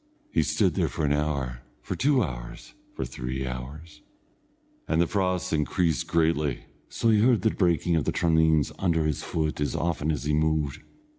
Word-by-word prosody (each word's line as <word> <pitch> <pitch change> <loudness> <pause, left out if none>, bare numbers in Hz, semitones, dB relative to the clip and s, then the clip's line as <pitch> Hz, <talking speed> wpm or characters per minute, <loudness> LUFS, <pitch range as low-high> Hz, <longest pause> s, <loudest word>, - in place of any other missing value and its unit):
He - - +3
stood 95 -6 +1
there - - +1
for 75 - -2
an 70 - +2
hour, 70 -5 -2 0.2
for - - -4
two 135 -3 +3
hours, - - -7 0.2
for 65 - -3
three 65 +1 -4
hours, 75 +5 -7 0.9
and 80 +1 +1
the 85 - +4
frost 90 -1 -1
increased 80 +2 0
greatly, 80 -5 +1 0.3
so 115 - 0
that - - +5
he 105 - +4
heard 120 -1 +3
the 110 - +3
breaking 85 -2 +1
of 80 - 0
the - - +1
traneens 80 -3 +2
under 85 -4 +1
his 75 -3 -1
foot 80 -2 -2
as 75 - -1
often 80 -2 -1
as 75 - -3
he 75 +1 0
moved. 75 -2 0
80 Hz, 180 wpm, -26 LUFS, 70-85 Hz, 0.9 s, that